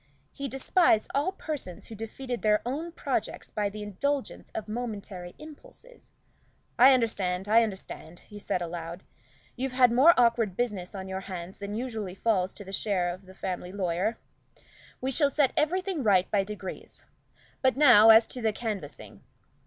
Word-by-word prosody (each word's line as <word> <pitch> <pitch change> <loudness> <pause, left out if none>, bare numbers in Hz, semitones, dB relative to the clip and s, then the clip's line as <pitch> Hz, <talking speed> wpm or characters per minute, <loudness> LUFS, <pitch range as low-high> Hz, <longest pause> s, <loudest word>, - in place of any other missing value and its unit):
He 280 - -5
despised 270 - +2
all 290 +7 +1
persons 295 - -6
who - - -10
defeated 235 +3 -5
their 210 -1 +2
own 305 +7 -3
projects - - -3
by 205 -1 -1
the 210 +1 -7
indulgence 270 +8 -3
of 220 - -4
momentary 210 -6 -6
impulses. 485 +11 -13 0.7
"I 260 +2 +8
understand, 195 -6 -1
I 225 +2 +6
understand," 190 -5 -5
he 210 - -12
said 180 -3 -2
aloud. 170 +1 -6 0.5
"You've 260 +1 -3
had 250 -2 +5
more 275 +8 +6
awkward 230 -5 +2
business 205 -6 -2
on 190 -1 -6
your 190 0 -4
hands 185 -1 -8
than 200 +1 -5
usually 220 -6 -4
falls 195 -3 +1
to - - -8
the 195 - -9
share 190 -3 0
of 185 +1 -13
a 190 - -13
family 180 -1 -4
lawyer. 190 +3 -1 0.8
We 260 +1 -1
shall 285 +2 +3
set 280 -2 +2
everything 365 +2 0
right 195 -6 +3
by 200 -2 +2
degrees. 200 -2 -8 0.6
But 260 0 +2
now 240 -7 +8
as 225 +1 +8
to 250 - -4
the 220 -1 +2
canvassing. 210 -9 -6
215 Hz, 160 wpm, -28 LUFS, 190-260 Hz, 0.8 s, I